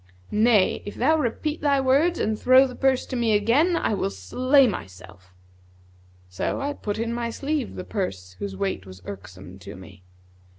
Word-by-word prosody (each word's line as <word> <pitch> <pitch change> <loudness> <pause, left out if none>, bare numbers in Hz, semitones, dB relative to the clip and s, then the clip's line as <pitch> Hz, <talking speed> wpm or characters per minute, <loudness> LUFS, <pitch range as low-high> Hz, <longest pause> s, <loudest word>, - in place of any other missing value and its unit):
Nay, 215 -2 +3
if 205 - -8
thou 305 +6 +3
repeat 300 +2 -2
thy 285 -2 +2
words 280 +7 +2
and 220 - 0
throw 255 +1 +6
the 255 - -6
purse 265 0 +1
to - - -6
me 235 -3 +1
again 260 - +3
I 280 - 0
will 190 - -1
slay 255 - +2
myself.' 95 - -7 1.0
So 90 0 -3
I 285 +1 -2
put 210 -7 -4
in 230 +1 -2
my 235 0 -2
sleeve[FN#152] 280 +3 -3
the 185 - -6
purse 95 - -4
whose 100 -1 -5
weight 95 0 -3
was 95 0 -12
irksome 95 -1 -10
to 90 - -10
me." 95 +1 -13
220 Hz, 175 wpm, -24 LUFS, -, 1.0 s, throw